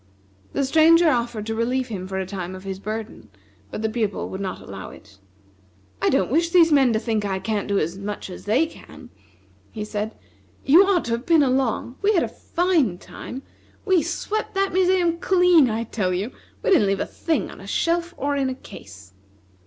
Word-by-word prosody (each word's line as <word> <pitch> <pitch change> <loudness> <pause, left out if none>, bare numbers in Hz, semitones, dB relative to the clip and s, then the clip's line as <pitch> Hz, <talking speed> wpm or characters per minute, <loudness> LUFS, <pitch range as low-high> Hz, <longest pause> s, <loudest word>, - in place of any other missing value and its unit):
The 275 - 0
Stranger 325 +3 +5
offered 235 -3 -2
to 225 - -2
relieve 245 +3 -1
him 185 -4 -5
for 190 0 -4
a 190 - -2
time 185 -1 -6
of 185 - -10
his 190 -1 -5
burden, 215 - -6 0.4
but 215 - -6
the - - +2
Pupil 215 -3 -2
would 190 - -6
not 190 -2 -4
allow 95 -1 -9
it. 100 -2 -16 0.8
"I - - +3
don't 190 - +1
wish 335 +4 +2
these 335 -2 +5
men 270 -4 +5
to 220 - +1
think 220 -2 -1
I 195 -2 -1
can't 205 +1 -2
do 200 -1 +1
as 170 +2 -2
much 205 +1 -5
as 180 - -10
they 235 +10 +3
can," 320 - -13 0.6
he 210 -2 -5
said. 210 +1 -4 0.5
"You 320 +8 +7
ought 380 -4 +2
to 235 - -3
have 235 +2 -2
been 325 -3 +5
along. 255 -1 0
We 415 +1 +3
had 345 - +3
a - - -1
fine 335 - 0
time! 260 +8 -9 0.4
We 375 -4 +4
swept 430 +7 -3
that 390 0 +1
museum 360 -2 +2
clean, 360 -7 +4
I 225 +1 -1
tell 190 -5 -1
you! 205 +7 -3 0.3
We - - +1
didn't 305 - +5
leave 195 0 0
a - - -1
thing 325 -2 -2
on - - -12
a - - -11
shelf 340 +1 0
or 285 +1 -1
in 270 -2 0
a 260 - -4
case." 95 - -13
240 Hz, 205 wpm, -23 LUFS, 200-330 Hz, 0.8 s, You